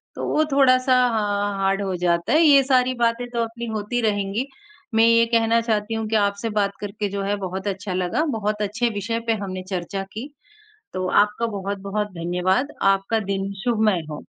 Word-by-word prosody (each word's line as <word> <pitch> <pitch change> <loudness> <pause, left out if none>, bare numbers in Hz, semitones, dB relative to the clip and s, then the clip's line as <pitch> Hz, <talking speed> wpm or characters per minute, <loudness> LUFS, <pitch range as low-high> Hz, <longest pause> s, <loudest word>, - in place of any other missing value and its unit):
तो - - -4
वो 310 - +2
थोड़ा-सा 255 -1 +4 0.2
हाँ 205 -1 0
हार्ड 195 +1 +1
हो 190 -2 -2
जाता 170 +5 +1
है। 315 - +5
ये 280 -3 +7
सारी 255 -1 +2
बातें 235 +1 +1
तो 235 -1 -1
अपनी 230 +1 -6
होती 215 +3 -2
रहेंगी 205 +5 -2 0.5
मैं 225 +1 +6
ये 230 0 +5
कहना 230 0 +3
चाहती 220 -1 -1
हूँ 225 -1 -2
कि 220 - -1
आपसे 200 +2 +1
बात 200 -2 0
करके 205 0 -4
जो 200 0 -3
है 200 +1 0
बहुत 190 +2 -5
अच्छा 195 -1 -3
लगा। 185 - 0 0.2
बहुत 210 0 -2
अच्छे 215 +4 0
विषय 225 +3 -2
पे 225 - +3
हमने 185 -1 -5
चर्चा 190 +1 -3
की, 220 +9 -8 0.6
तो 185 0 -2 0.2
आपका 210 +3 -3
बहुत-बहुत 200 +1 -3
धन्यवाद 180 - 0 0.2
आपका 195 +3 0
दिन 195 0 -2
शुभमय 215 -8 +1
हो। 150 - -7
210 Hz, 185 wpm, -22 LUFS, 195-230 Hz, 0.6 s, ये